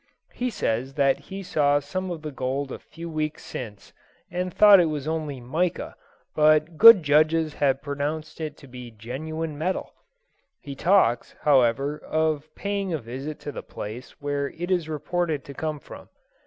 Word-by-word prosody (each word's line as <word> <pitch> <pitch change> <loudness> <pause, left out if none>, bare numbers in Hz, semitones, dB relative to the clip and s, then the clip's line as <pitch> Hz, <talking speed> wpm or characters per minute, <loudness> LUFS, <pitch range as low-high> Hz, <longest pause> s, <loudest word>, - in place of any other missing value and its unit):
He 250 +1 -2
says 130 - -2
that 140 -2 +3
he 195 +1 -6
saw 145 -5 +2
some 185 +6 -4
of 165 -3 -6
this 150 -2 -5
gold 135 +1 -2
a - - -6
few 170 +1 -10
weeks 155 -2 -3
since, 105 -5 -8 0.4
and 180 +1 -2
thought 205 +1 +8
it 170 - +4
was 150 -1 -4
only 155 -4 -3
"mica," 165 +9 -2 0.4
but 155 +1 +3
good 220 0 +9
judges 155 +2 +3
have 140 -1 +1
pronounced 150 +2 -4
it 155 -2 -5
to 140 - -14
be 125 -1 -9
genuine 145 +8 -5
metal. 185 +4 -2 0.7
He 140 - -8
talks, 135 - +2
however, 140 +1 +3
of 155 -1 -1
paying 200 -2 -2
a 160 - 0
visit 135 +4 -7
to 145 - -5
the - - -6
place 115 +9 -8
where 145 -1 -2
it 175 +3 -5
is 175 -4 0
reported 155 -1 -2
to 140 - -9
come 155 +1 -3
from. - - -12
150 Hz, 170 wpm, -25 LUFS, 140-165 Hz, 0.7 s, good